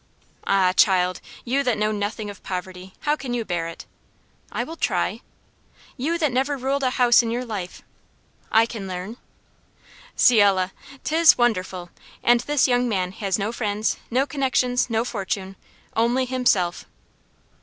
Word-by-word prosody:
"Ah, 190 -2 +3
child! 180 -2 +3 0.2
you 265 +3 +1
that 250 -4 +1
know 215 0 +1
nothing 210 +1 -3
of 205 -2 -9
poverty, 185 0 -6
how 295 0 +1
can 260 -5 -4
you 235 -2 -2
bear 170 -3 -2
it?" 165 - -9 0.7
"I - - -2
will 325 - -8
try." - - -1 0.7
"You 310 +6 -1
that 305 -5 +1
never 270 +3 0
ruled 270 +2 -1
a 260 - +2
house 245 -1 +5
in 230 - -3
your 245 +2 -2
life 200 -6 -6 0.3
" - - -36
"I - - +3
can 220 -4 -7
learn." 185 +5 -6 1.0
"Ciel! 200 -6 +4 0.3
'tis 325 +1 +5
wonderful! 185 -7 -1 0.3
And 240 0 +5
this 290 +3 +2
young 245 -1 +2
man 185 -4 -1
has 195 -1 -2
no 210 +2 -2
friends, 215 -2 -1
no 255 +3 +2
connections, 255 -3 0
no 225 0 0
fortune! 195 -4 -4 0.4
only 240 +3 +2
himself." 240 -9 +1
225 Hz, 155 wpm, -23 LUFS, 190-255 Hz, 1.0 s, house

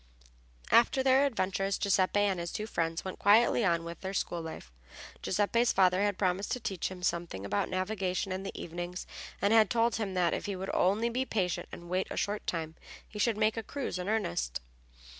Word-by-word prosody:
After 240 +3 +5
their 270 +2 +5
adventure 195 -5 -1
Giuseppe 200 0 +2
and 195 -3 +1
his 170 0 -4
two 215 - -3
friends 165 -5 -2
went 190 - -6
quietly 225 +3 +5
on 170 -4 +2
with 170 0 -8
their 190 +1 -4
school 175 -3 -1
life. 160 - -8 0.5
Giuseppe's 220 +5 +2
father 185 0 +3
had 205 -2 +1
promised 190 +1 0
to 250 - -2
teach 195 -6 -3
him 185 -1 -9
something 170 - -2
about 100 +1 -1
navigation 185 0 -1
in 185 +1 -2
the 195 - -6
evenings, 175 +2 -5 0.4
and 200 +2 +4
had 220 -2 +6
told 235 -1 +2
him 200 -4 -3
that, 175 -3 +2
if - - -3
he 200 - -2
would 190 +1 -4
only 205 +6 +2
be 250 +3 0
patient 190 -8 -2
and 175 - -9
wait 185 +2 -1
a - - -5
short 205 +1 -2
time, 160 -2 -2 0.3
he 210 - -9
should 225 0 +2
make 215 0 +2
a - - 0
cruise 235 -5 -4
in 180 +2 -3
earnest. 75 - -1
190 Hz, 200 wpm, -30 LUFS, 175-215 Hz, 0.5 s, had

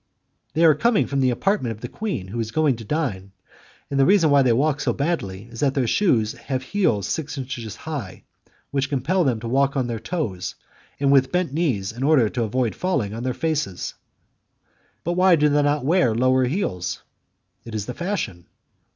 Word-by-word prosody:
"They 165 +2 +4
are 160 - +7
coming 225 - +2
from 140 - -2
the 130 -1 +3
apartment 125 - 0
of 110 - -14
the 120 - -4
queen 155 - -4
who 115 +4 -4
is 110 -1 -2
going 150 +1 +2
to 115 - -8
dine, 105 -9 -3 0.6
and 140 - 0
the 135 - +6
reason 185 -6 +5
why 140 -1 +6
they 130 -2 +3
walk 145 +4 +1
so - - +1
badly 120 - -2
is 115 0 -11
that 135 -2 +1
their 135 -3 +2
shoes 115 - +2
have 130 -2 -4
heels 130 - 0
six 145 -2 -3
inches 125 -5 -5
high, 140 -12 -6 0.5
which 135 -1 0
compel 150 +7 +1
them 125 -7 +1
to 115 - -5
walk 135 +3 +1
on 130 - +1
their 115 -2 -3
toes 115 - -3 0.4
and 140 0 +3
with 135 -1 +4
bent 180 -6 0
knees 130 - 0
in 120 +3 -9
order 135 -6 +4
to 120 - -3
avoid 115 +1 0
falling 140 - -1
on 115 - -5
their 125 0 -2
faces." 150 - -2 1.1
"But 175 - -1
why 180 0 +5
do 150 -1 +3
they 145 0 +3
not 145 -2 +1
wear 160 -8 +3
lower 130 +2 +3
heels?" 125 - -2 0.6
"It 115 -2 -8
is 105 -2 -2
the 125 - -5
fashion." 175 - -4
135 Hz, 200 wpm, -23 LUFS, 115-155 Hz, 1.1 s, are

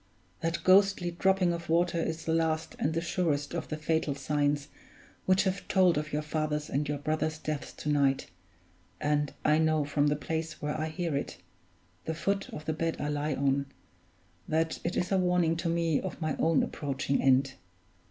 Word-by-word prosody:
That 165 0 -2
ghostly 190 -2 +4
dropping 185 0 +2
of 170 0 -6
water 170 +1 +2
is 160 0 -3
the 160 - +1
last 160 0 0
and 160 +2 0
the 165 - +1
surest 160 -4 -1
of 170 - -3
the 155 - -4
fatal 155 -2 0
signs 145 0 0 0.6
which 185 0 +4
have 190 -1 -2
told 185 -2 +4
of 150 +1 -2
your 150 +1 -1
father's 150 -1 -2
and 145 +2 0
your 145 - -1
brother's 155 +2 -1
deaths 155 -2 -4
to - - -8
night, 140 -2 +2 0.7
and 145 -1 +1
I 150 +1 +4
know 155 -2 +2
from 145 0 +1
the 145 - +2
place 160 +2 -4
where 150 0 -2
I 155 0 -2
hear 165 -1 -2
it 140 - -3 0.7
the 160 - -2
foot 195 +4 -1
of 155 - -8
the 155 - 0
bed 165 +1 -1
I 145 - -2
lie 145 0 -1
on 140 0 +1 0.8
that 160 +1 0
it 170 - -2
is 180 - -1
a 190 - +3
warning 180 -2 +2
to 170 0 -1
me 165 -2 +1
of 190 - -5
my 155 -3 -1
own 165 -2 +3
approaching 140 -1 -1
end. 135 0 +3
155 Hz, 190 wpm, -29 LUFS, 145-170 Hz, 0.8 s, ghostly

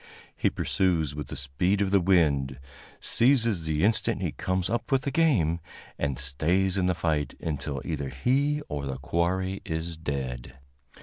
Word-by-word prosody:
He - - +2
pursues 85 -6 0
with 75 -2 -5
the - - -6
speed 70 +9 0
of 100 -2 +1
the 100 -1 +4
wind, 75 -8 +2 0.4
seizes 115 - +3
the 80 0 0
instant 110 0 +2
he - - -1
comes 95 -1 -1
up 120 +6 -2
with 135 -1 +3
the 140 - -1
game, 115 - +2 0.4
and 70 -3 -1
stays 85 +9 +1
in 95 -2 +1
the 90 - +1
fight 75 -4 -1
until 70 -3 -3
either 70 -4 -3
he 140 - +1
or 70 -1 -4
the 65 -1 -3
quarry 90 +7 -1
is 80 0 -4
dead. 65 -5 -4
85 Hz, 165 wpm, -27 LUFS, 70-95 Hz, 0.4 s, the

